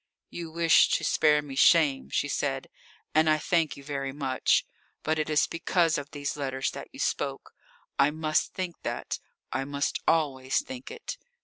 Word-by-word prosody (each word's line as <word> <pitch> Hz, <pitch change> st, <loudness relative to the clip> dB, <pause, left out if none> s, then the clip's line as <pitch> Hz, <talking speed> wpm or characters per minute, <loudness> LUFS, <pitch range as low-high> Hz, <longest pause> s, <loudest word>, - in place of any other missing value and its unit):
"You 170 Hz, -1 st, -6 dB
wish 165 Hz, 0 st, +5 dB
to -, -, -8 dB
spare 150 Hz, -1 st, +3 dB
me 140 Hz, -2 st, -8 dB
shame," 145 Hz, -2 st, +4 dB
she 145 Hz, -, 0 dB
said, 135 Hz, -1 st, -2 dB, 0.4 s
"and 155 Hz, +1 st, +4 dB
I 155 Hz, -, +4 dB
thank 165 Hz, 0 st, 0 dB
you 140 Hz, -, -11 dB
very 135 Hz, -1 st, -3 dB
much. 135 Hz, -2 st, +1 dB, 0.4 s
But 155 Hz, 0 st, 0 dB
it 155 Hz, -, -1 dB
is 150 Hz, -1 st, +3 dB
because 165 Hz, -1 st, +1 dB
of 145 Hz, 0 st, -8 dB
these 145 Hz, -1 st, -4 dB
letters 135 Hz, -2 st, -2 dB
that -, -, -8 dB
you -, -, -12 dB
spoke. -, -, -2 dB, 0.5 s
I 140 Hz, -, +6 dB
must 155 Hz, 0 st, 0 dB
think 185 Hz, -3 st, -4 dB
that. -, -, -3 dB, 0.3 s
I 135 Hz, +2 st, 0 dB
must 140 Hz, +1 st, -1 dB
always 135 Hz, -5 st, +1 dB
think 260 Hz, +4 st, -8 dB
it." 470 Hz, +2 st, -7 dB
150 Hz, 175 wpm, -28 LUFS, 140-165 Hz, 0.5 s, I